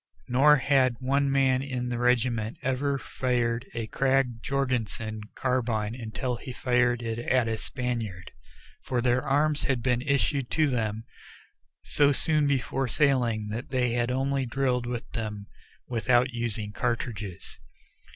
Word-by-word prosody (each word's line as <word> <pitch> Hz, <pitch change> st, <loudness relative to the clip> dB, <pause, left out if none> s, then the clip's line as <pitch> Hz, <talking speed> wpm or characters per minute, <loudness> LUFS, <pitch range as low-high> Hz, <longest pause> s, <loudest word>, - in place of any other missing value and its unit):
Nor 140 Hz, +4 st, +6 dB
had 135 Hz, -2 st, +3 dB
one 140 Hz, +2 st, +1 dB
man 135 Hz, -1 st, +3 dB
in 130 Hz, -3 st, -3 dB
the 120 Hz, -1 st, -2 dB
regiment 120 Hz, -2 st, +1 dB
ever 140 Hz, +2 st, 0 dB
fired 120 Hz, -2 st, -1 dB
a 115 Hz, -1 st, -2 dB
Krag 130 Hz, -1 st, +1 dB
Jorgensen 115 Hz, -5 st, -2 dB
carbine 115 Hz, -4 st, 0 dB
until 120 Hz, +1 st, -3 dB
he 130 Hz, -, -8 dB
fired 125 Hz, -1 st, +1 dB
it 115 Hz, 0 st, -3 dB
at 120 Hz, 0 st, +1 dB
a 115 Hz, -, 0 dB
Spaniard, 115 Hz, -6 st, -4 dB, 0.5 s
for 125 Hz, -, -2 dB
their 125 Hz, +1 st, +2 dB
arms 145 Hz, +1 st, +1 dB
had 130 Hz, -5 st, 0 dB
been 125 Hz, -1 st, +1 dB
issued 140 Hz, -1 st, 0 dB
to 155 Hz, -, +2 dB
them 110 Hz, -5 st, -1 dB, 0.8 s
so 145 Hz, -1 st, +3 dB
soon 150 Hz, +1 st, +2 dB
before 135 Hz, -1 st, 0 dB
sailing 120 Hz, -5 st, +1 dB
that 115 Hz, +4 st, -5 dB
they 125 Hz, -2 st, +1 dB
had 120 Hz, 0 st, 0 dB
only 135 Hz, +1 st, 0 dB
drilled 125 Hz, -1 st, 0 dB
with 120 Hz, -1 st, -4 dB
them 105 Hz, -3 st, -4 dB, 0.4 s
without 125 Hz, +2 st, +2 dB
using 115 Hz, -3 st, -2 dB
cartridges. 110 Hz, -5 st, -4 dB
125 Hz, 140 wpm, -27 LUFS, 115-135 Hz, 0.8 s, Nor